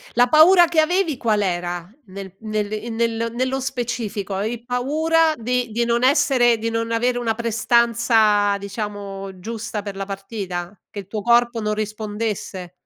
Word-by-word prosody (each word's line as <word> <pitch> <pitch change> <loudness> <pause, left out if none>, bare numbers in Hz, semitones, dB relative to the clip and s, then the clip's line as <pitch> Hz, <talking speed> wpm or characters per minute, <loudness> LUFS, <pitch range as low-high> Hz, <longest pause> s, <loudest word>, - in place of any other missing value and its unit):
La 245 0 +5
paura 345 +6 +7
che 330 -1 +1
avevi, 345 -2 +1
qual 220 -4 0
era? 175 -2 -2 0.2
Nel 190 -1 -9
nel 215 -1 -2
in 225 +2 -4
nel 230 0 -1
nello 260 +2 -1
specifico, 235 -6 -3
avevi 220 +5 -3
paura 315 +6 +2
di 245 0 -1
di 235 +2 0
non 235 +1 +1
essere 260 -4 +4
di 225 +1 -2
non 230 0 -2
avere 245 +2 +1
una 235 -2 0
prestanza, 225 -2 +2
diciamo, 200 -2 -6
giusta 225 +1 -5
per 200 -1 -7
la 195 - -4
partita, 195 -2 -6
che 205 - -7
il 195 - -9
tuo 210 0 -4
corpo 235 0 +3
non 210 0 -1
rispondesse? 210 -3 -4
225 Hz, 160 wpm, -21 LUFS, 205-245 Hz, 0.2 s, paura